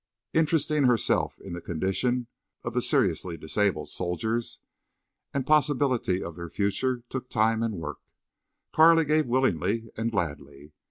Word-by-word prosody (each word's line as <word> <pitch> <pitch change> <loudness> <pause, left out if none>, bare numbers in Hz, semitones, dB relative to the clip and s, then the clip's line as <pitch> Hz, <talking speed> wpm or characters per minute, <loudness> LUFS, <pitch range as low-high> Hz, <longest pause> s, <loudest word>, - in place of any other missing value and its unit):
Interesting 155 -2 +2
herself 120 -3 +1
in - - -8
the 85 - -6
condition 95 +10 -1 0.4
of - - -4
the - - +1
seriously 85 -3 +2
disabled 80 -1 -1
soldiers 110 +8 -2 0.7
and 135 -2 -2
possibility 140 -10 +2
of 85 - -7
their 85 0 -7
future 120 +6 -1
took 130 0 -6
time 110 +1 +2
and 115 -2 -1
work 75 -4 -6 0.7
Carley 165 0 +6
gave 155 -1 +2
willingly 115 - 0
and 115 +1 -1
gladly. 75 -7 -4
115 Hz, 130 wpm, -27 LUFS, 90-130 Hz, 0.7 s, Carley